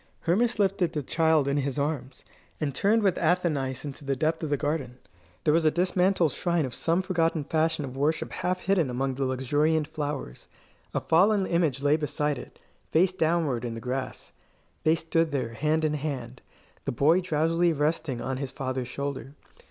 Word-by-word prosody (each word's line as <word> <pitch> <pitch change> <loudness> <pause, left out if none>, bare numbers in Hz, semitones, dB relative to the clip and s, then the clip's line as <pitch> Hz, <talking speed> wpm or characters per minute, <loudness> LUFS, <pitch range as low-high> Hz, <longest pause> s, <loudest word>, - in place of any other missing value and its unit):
Hermas 225 +8 +1
lifted 195 -4 +1
the 150 -3 -2
child 160 0 +2
in 140 +1 +1
his 140 0 -1
arms, 140 -3 -3 0.3
and 145 -3 -1
turned 210 - +2
with 190 -3 +2
Athenais 145 -7 0
into 145 0 -7
the 140 -1 -1
depth 155 +4 0
of 155 - -3
the 145 - +1
garden. 145 -4 -2 0.5
There 150 - +3
was 165 +1 +3
a 155 - +5
dismantled 180 -1 +2
shrine 170 +1 0
of 125 - -5
some 170 +7 +1
forgotten 165 -4 0
fashion 160 0 0
of 130 -1 -8
worship 150 +4 0
half 180 0 -2
hidden 185 -8 +2
among 130 +2 -1
the 135 +1 -2
luxuriant 145 +5 +1
flowers. 145 - -5 0.5
A - - +1
fallen 195 +4 +3
image 160 -7 0
lay 145 +1 +4
beside 150 -2 -1
it, - - -12 0.3
face 180 +3 +3
downward 160 -8 0
in 115 -2 -4
the - - -5
grass. 130 +3 -4 0.5
They 160 +1 +4
stood 165 0 0
there, 125 -5 -2
hand 155 +5 +1
in 150 - +1
hand, 135 -5 -4 0.4
the - - -1
boy 155 +9 +3
drowsily 165 0 +2
resting 150 -4 -1
on 130 +1 -2
his 135 -1 -4
father's 130 -2 -3
shoulder. 140 0 -5
150 Hz, 180 wpm, -27 LUFS, 135-165 Hz, 0.5 s, a